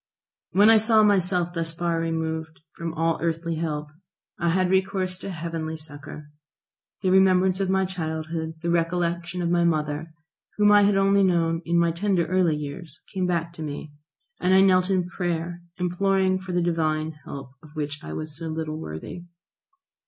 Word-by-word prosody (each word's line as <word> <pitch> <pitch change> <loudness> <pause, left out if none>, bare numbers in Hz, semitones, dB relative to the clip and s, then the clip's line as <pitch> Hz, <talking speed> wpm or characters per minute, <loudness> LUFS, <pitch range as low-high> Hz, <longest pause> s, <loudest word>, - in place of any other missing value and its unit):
When 205 +4 +6
I 225 - +7
saw 220 0 +4
myself 180 -4 +2
thus 165 -1 -2
far 170 0 -1
removed 160 -1 -3
from 170 -1 -4
all 165 +1 +1
earthly 165 0 -1
help 150 -2 -3 0.5
I 170 -1 +1
had 185 +1 +2
recourse 190 -1 +1
to 195 - -6
heavenly 165 -2 -4
succour. 150 0 -9 0.7
The 185 - +2
remembrance 190 0 +4
of 195 -1 0
my 190 0 +2
childhood, 160 -2 -4
the 170 - 0
recollection 175 +1 -1
of 170 - 0
my 175 0 +3
mother, 155 -1 -1 0.5
whom 210 0 +5
I 205 0 +7
had 200 -1 +3
only 195 0 +4
known 165 -3 +2
in 170 +1 +1
my 170 -1 +3
tender 175 0 +1
early 180 -3 +2
years, 150 +2 -7
came 185 -1 0
back 170 -1 -1
to 160 - -10
me, 150 0 -6 0.5
and 185 +1 +3
I 190 - +7
knelt 185 -1 +4
in 185 -2 +1
prayer 175 -1 -3 0.2
imploring 185 +1 +1
for 185 0 -7
the 175 -1 +1
Divine 160 -2 0
help 135 -2 -8
of 155 0 -16
which 150 0 -4
I - - -7
was 155 -1 -5
so 165 +1 -6
little 155 -1 -4
worthy. 80 - -7
170 Hz, 175 wpm, -25 LUFS, 160-185 Hz, 0.7 s, I